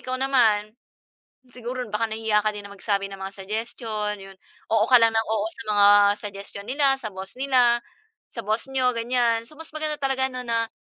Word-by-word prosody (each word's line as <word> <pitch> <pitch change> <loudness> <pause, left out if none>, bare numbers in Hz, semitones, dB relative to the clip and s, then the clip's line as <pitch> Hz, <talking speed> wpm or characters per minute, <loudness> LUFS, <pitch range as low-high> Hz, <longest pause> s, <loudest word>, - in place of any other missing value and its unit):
ikaw 255 0 -3
naman, 225 -6 +2 0.8
siguro 250 +1 -5
baka 220 +2 0
nahihiya 220 -1 +1
ka 215 - +2
din 205 -1 -7
ng 200 - -11
magsabi 200 -1 -1
ng 195 -1 -9
mga 195 0 -6
suggestion, 215 0 -3
yun. 195 0 -12 0.4
Oo 220 0 +4
ka 250 - +9
lang 230 0 +5
ng 225 - +3
oo 220 -1 0
sa - - -8
mga 205 -1 +5 0.3
suggestion 200 0 -8
nila, 275 0 +3
sa 215 - -4
boss 190 +5 -8
nila, 250 -3 +4 0.5
sa 230 - -5
boss 215 +4 0
niyo, 255 -1 +2
ganyan. 230 -1 +1
So, - - -14
mas 320 0 -9
maganda 310 -1 -3
talaga 265 -1 +1
ano 255 0 -5
na 230 -1 0
225 Hz, 195 wpm, -24 LUFS, 210-255 Hz, 0.8 s, ka